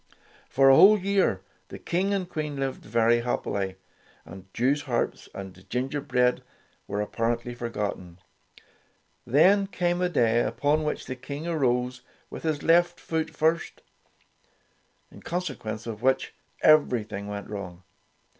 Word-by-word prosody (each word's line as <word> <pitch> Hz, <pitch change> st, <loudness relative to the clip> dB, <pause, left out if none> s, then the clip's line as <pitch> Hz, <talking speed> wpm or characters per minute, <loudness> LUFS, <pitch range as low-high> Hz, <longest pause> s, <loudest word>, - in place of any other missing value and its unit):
For 135 Hz, +1 st, +5 dB
a -, -, +7 dB
whole 210 Hz, +7 st, +8 dB
year 200 Hz, 0 st, +1 dB, 0.3 s
the -, -, -9 dB
King 185 Hz, +4 st, -1 dB
and 195 Hz, -3 st, -1 dB
Queen 155 Hz, -4 st, -4 dB
lived 135 Hz, -1 st, -3 dB
very 115 Hz, +1 st, +2 dB
happily, 100 Hz, -5 st, -2 dB, 0.5 s
and 95 Hz, 0 st, -12 dB
Jewsharps 130 Hz, 0 st, -1 dB
and 95 Hz, -1 st, -10 dB
gin 125 Hz, +2 st, -1 dB
gerbread 125 Hz, -4 st, +1 dB, 0.5 s
were 100 Hz, +1 st, -2 dB
apparently 115 Hz, +3 st, -2 dB
forgotten. 105 Hz, -7 st, -5 dB, 1.1 s
Then 190 Hz, -, +4 dB
came 175 Hz, -2 st, -1 dB
a 180 Hz, -, +1 dB
day 120 Hz, -7 st, +2 dB
upon 150 Hz, +5 st, 0 dB
which 150 Hz, -, -3 dB
the 130 Hz, -, -5 dB
King 140 Hz, +4 st, -7 dB
arose 125 Hz, -6 st, 0 dB, 0.3 s
with -, -, -7 dB
his 155 Hz, -2 st, -2 dB
left 175 Hz, +1 st, +3 dB
foot 160 Hz, -1 st, -2 dB
first, 160 Hz, +2 st, -1 dB, 1.3 s
in -, -, -14 dB
consequence 115 Hz, -11 st, -4 dB
of 110 Hz, -2 st, -6 dB
which 130 Hz, +1 st, +1 dB, 0.3 s
everything 110 Hz, -9 st, +3 dB
went 100 Hz, 0 st, -6 dB
wrong. 95 Hz, -4 st, -7 dB
130 Hz, 130 wpm, -26 LUFS, 115-160 Hz, 1.3 s, whole